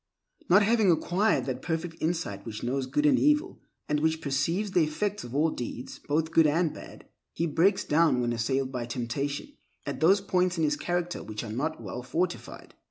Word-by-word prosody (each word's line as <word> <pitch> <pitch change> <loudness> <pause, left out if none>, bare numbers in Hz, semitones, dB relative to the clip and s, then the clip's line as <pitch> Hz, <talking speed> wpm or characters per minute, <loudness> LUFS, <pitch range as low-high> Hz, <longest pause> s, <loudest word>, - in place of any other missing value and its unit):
Not 195 +4 +6
having 220 -2 +3
acquired 180 +5 +2
that 130 -1 -3
perfect 165 0 -4
insight 160 - -2
which 110 -2 -7
knows 130 +2 -1
good 295 - 0
and 280 -3 +5
evil 300 +5 +2 0.3
and 150 - +1
which 160 +1 +1
perceives 165 +8 -1
the 175 -3 +4
effects 200 +7 -2
of 120 +2 -8
all 155 +2 +3
deeds 125 +1 -6
both 160 +2 0
good 165 -1 +5
and 160 +2 +1
bad, - - -11 0.3
he 170 - 0
breaks 170 +5 +2
down 155 -4 +3
when 120 -1 0
assailed 130 +3 -1
by 120 -2 -4
temptation 130 +4 -3 0.4
at - - -4
those 190 +6 +5
points 185 -2 0
in 160 - +1
his 150 -1 +2
character 175 +2 -2
which 105 +1 -6
are 110 -2 -6
not 155 +7 -2
well 115 +2 -6
fortified. 170 +8 -4
160 Hz, 190 wpm, -28 LUFS, 130-180 Hz, 0.4 s, Not